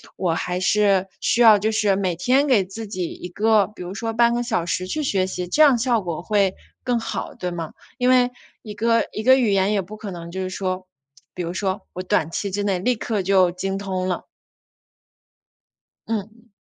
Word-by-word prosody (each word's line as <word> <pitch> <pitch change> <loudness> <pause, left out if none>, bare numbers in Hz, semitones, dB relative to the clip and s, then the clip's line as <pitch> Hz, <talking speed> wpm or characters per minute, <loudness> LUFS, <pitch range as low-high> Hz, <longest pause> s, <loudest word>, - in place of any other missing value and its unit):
我 175 -3 0
还 180 +2 -2
是 195 0 +2
需 240 - +2
要 220 -3 +8
就 215 +2 0
是 215 -3 +2
每 190 -3 -1
天 255 - +2
给 225 -9 +3
自 215 +3 -8
己 185 -4 -3
一 - - -8
个， 210 +1 +3
比 210 -3 -10
如 180 +2 -6
说 225 +2 -3
半 235 +1 +4
个 240 - 0
小 225 -8 -1
时 180 +1 -2
去 305 +9 -2
学 195 -8 +1
习， 180 -1 -4
这 295 - +1
样 285 -5 +7
效 235 -1 +1
果 175 -2 -5
会 200 -2 +1 0.3
更 245 -2 0
好， - - -5
对 180 -1 -4
吗？ 165 -2 -5 0.3
因 250 - +3
为 250 -1 +4 0.3
一 215 - -7
个 230 +2 +2
一 - - -4
个 260 +4 +6
语 235 -5 +2
言 195 +1 +2
也 205 - +2
不 205 +4 -10
可 215 -1 -7
能 170 -1 -8
就 190 - -4
是 185 - -3
说， 185 -1 -3 0.5
比 180 - -5
如 170 - -4
说 190 +1 -2
我 185 - -5
短 180 -5 +1
期 200 +3 -2
之 205 +2 -2
内 195 -3 0
立 245 +7 +1
刻 215 -2 -2
就 185 -1 +3
精 195 +2 -3
通 190 -2 -3
了。 180 - -3 1.8
嗯。 225 +2 -5
200 Hz, 230 characters per minute, -22 LUFS, 185-225 Hz, 1.8 s, 要